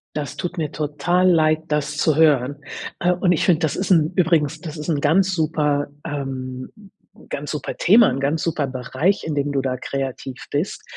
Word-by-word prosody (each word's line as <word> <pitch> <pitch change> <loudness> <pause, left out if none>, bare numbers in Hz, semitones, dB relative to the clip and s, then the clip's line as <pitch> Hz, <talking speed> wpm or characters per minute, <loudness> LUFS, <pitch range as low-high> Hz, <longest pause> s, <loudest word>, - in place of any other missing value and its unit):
Das 150 -2 -4
tut 175 +1 -4
mir 155 -3 -2
total 175 +5 +1
leid, 155 -2 +3
das 150 0 -1
zu 155 -1 +2
hören. 145 -3 +3 0.4
Äh, 180 - +2
und 180 0 +1
ich 165 - +1
finde, 170 -4 +4
das 160 -4 0
ist 190 0 -2
'n 160 -3 +4
übrigens, 160 -4 +2
das 160 -3 -7
ist 150 +3 -5
'n 145 -3 0
ganz 185 +6 +3
super 150 -3 0 0.2
ähm, 130 -3 -5 0.6
ganz 145 +1 -4
super 150 -3 -4
Thema, 220 +5 +6
'n 130 - -2
ganz 145 +4 0
super 155 -4 -1
Bereich, 130 +9 -1
in 155 -2 -3
dem 145 0 0
du 140 -1 0
da 130 -1 -2
kreativ 135 -1 -5
bist. 150 +7 -2
150 Hz, 190 wpm, -21 LUFS, 140-165 Hz, 0.6 s, Thema